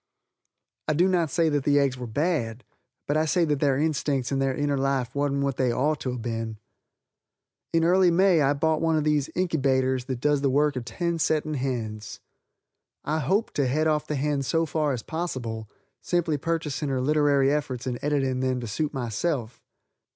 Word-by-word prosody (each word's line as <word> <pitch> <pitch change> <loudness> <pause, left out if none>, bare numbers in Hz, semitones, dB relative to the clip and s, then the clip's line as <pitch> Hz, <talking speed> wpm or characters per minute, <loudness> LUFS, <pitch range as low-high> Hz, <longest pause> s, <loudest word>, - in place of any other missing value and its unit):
I 155 - +2
do 175 +4 +4
not 175 -4 +1
say 165 +1 +2
that 145 -2 0
the 145 +1 +3
eggs 140 -2 +2
were 125 -1 -6
bad, 125 -3 -1 0.4
but 145 - 0
I 155 - +2
say 170 +2 +2
that 150 -3 0
their 140 -2 +2
instincts 145 -4 0
and 135 -1 0
their 135 -1 0
inner 145 -1 0
life 135 -2 0
wasn't 140 -1 0
what 140 -1 -1
they 130 -2 +2
ort 150 +5 0
to 130 - -3
have 120 -2 -6
been. 115 -2 -4 1.1
In 165 0 +2
early 180 +2 +5
May 175 -1 +4
I 140 0 +3
bought 155 +2 0
one 165 -1 +2
of 155 - +1
these 150 -1 +1
inkybaters 130 -7 +1
that 130 -3 -3
does 145 +1 +2
the 140 - +2
work 145 +2 +2
of 125 -2 -4
ten 170 +8 -2
setting 155 -1 0
hens. 115 -6 -4 0.8
I 155 +2 -1
hoped 195 - 0
to 140 -3 +2
head 155 +5 +1
off 155 -1 +1
the 150 - -2
hen 145 0 0
so 165 +5 +1
far 155 -1 0
as 125 -4 -3
possible, 120 -10 -4 0.3
simply 170 -3 0
purchasing 150 -1 -2
her 135 -1 0
literary 140 0 +3
efforts 130 -4 -3
and 125 -2 -3
editing 135 -3 0
them 130 -1 0
to 120 - -5
suit 145 +8 -2
myself. 120 0 -2
145 Hz, 195 wpm, -26 LUFS, 130-155 Hz, 1.1 s, early